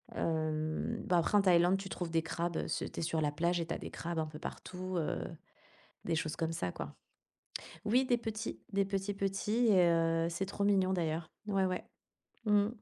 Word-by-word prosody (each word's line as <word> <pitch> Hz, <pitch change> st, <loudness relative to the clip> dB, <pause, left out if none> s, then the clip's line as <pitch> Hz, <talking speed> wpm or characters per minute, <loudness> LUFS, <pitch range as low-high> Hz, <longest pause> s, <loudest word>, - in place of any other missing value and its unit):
Hem, 155 Hz, -1 st, -1 dB
bah 180 Hz, -, +3 dB
après 170 Hz, +5 st, +3 dB
en -, -, +6 dB
Thaïlande, 180 Hz, 0 st, +5 dB
tu 195 Hz, 0 st, -6 dB
trouves 175 Hz, -3 st, -3 dB
des 165 Hz, 0 st, +2 dB
crabes, 170 Hz, +1 st, -2 dB
heu, -, -, -1 dB
c'est -, -, -1 dB
tu -, -, -5 dB
es -, -, -1 dB
sur 160 Hz, 0 st, 0 dB
la 150 Hz, -2 st, +1 dB
plage 170 Hz, +3 st, +1 dB
et 165 Hz, -, -1 dB
tu 165 Hz, -, -1 dB
as -, -, -2 dB
des -, -, -7 dB
crabes 170 Hz, -1 st, -3 dB
un 155 Hz, -, 0 dB
peu 150 Hz, 0 st, -9 dB
partout, 185 Hz, +2 st, -5 dB
heu, 160 Hz, -, 0 dB, 0.8 s
des 165 Hz, -, 0 dB
choses 155 Hz, 0 st, -1 dB
comme 165 Hz, 0 st, -1 dB
ça 90 Hz, -, -2 dB
quoi. 70 Hz, 0 st, -6 dB, 0.9 s
Oui, 250 Hz, +5 st, +3 dB
des 245 Hz, -1 st, +3 dB
petits 220 Hz, -1 st, -4 dB
des 200 Hz, -1 st, +2 dB
petits, 195 Hz, +1 st, -1 dB
petits 200 Hz, +4 st, +1 dB
et 180 Hz, -5 st, +6 dB
heu, 165 Hz, 0 st, +3 dB
c'est 180 Hz, +3 st, -2 dB
trop 200 Hz, +1 st, -3 dB
mignon 190 Hz, -2 st, +3 dB
d'ailleurs. 165 Hz, -2 st, -1 dB, 0.2 s
Ouais, 195 Hz, -2 st, +2 dB
ouais. 185 Hz, -1 st, -1 dB, 0.7 s
Mmh. 205 Hz, 0 st, +5 dB
175 Hz, 210 wpm, -34 LUFS, 165-195 Hz, 0.9 s, en